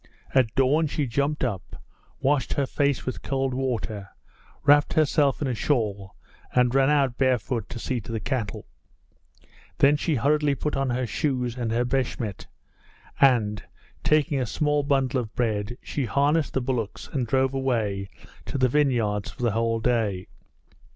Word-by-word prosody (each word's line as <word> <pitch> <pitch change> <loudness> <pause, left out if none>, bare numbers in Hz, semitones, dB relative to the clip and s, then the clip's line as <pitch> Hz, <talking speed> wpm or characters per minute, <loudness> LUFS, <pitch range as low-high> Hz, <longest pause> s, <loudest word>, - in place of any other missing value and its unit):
At 125 -5 +2
dawn 145 +4 +3
she 150 0 -1
jumped 140 +5 -1
up, 110 -8 -3 0.4
washed 135 -1 +1
her 140 - 0
face 140 0 0
with 130 - -4
cold 135 -1 -1
water, 115 -6 -3 0.5
wrapped 145 +1 +5
herself 150 -3 +2
in - - 0
a 130 - 0
shawl, 105 - -1 0.4
and 125 -1 +3
ran 135 0 +4
out 140 -4 +2
barefoot 125 -3 0
to 130 - -6
see 120 +1 -2
to 110 - -9
the 115 - -2
cattle. 115 -1 -3 1.1
Then 145 +2 +5
she 155 +1 0
hurriedly 145 +2 +2
put 150 +2 -2
on 135 -1 0
her 125 +1 0
shoes 125 -2 -1
and 120 -3 -2
her 120 +2 +1
beshmet 120 -5 -2 0.7
and, 110 -6 +3 0.4
taking 150 -1 +2
a 125 - -1
small 150 +5 +1
bundle 135 -2 +1
of 110 -2 -9
bread, 110 -1 -1
she 140 - -2
harnessed 140 +6 +1
the 135 - +2
bullocks 120 -5 -3
and 130 -4 -2
drove 130 +2 +1
away 110 -8 -1 0.4
to - - -3
the 130 -1 +3
vineyards 120 -8 +1
for - - -8
the 120 - +2
whole 115 +1 0
day. 110 -6 0
130 Hz, 160 wpm, -25 LUFS, 115-140 Hz, 1.1 s, wrapped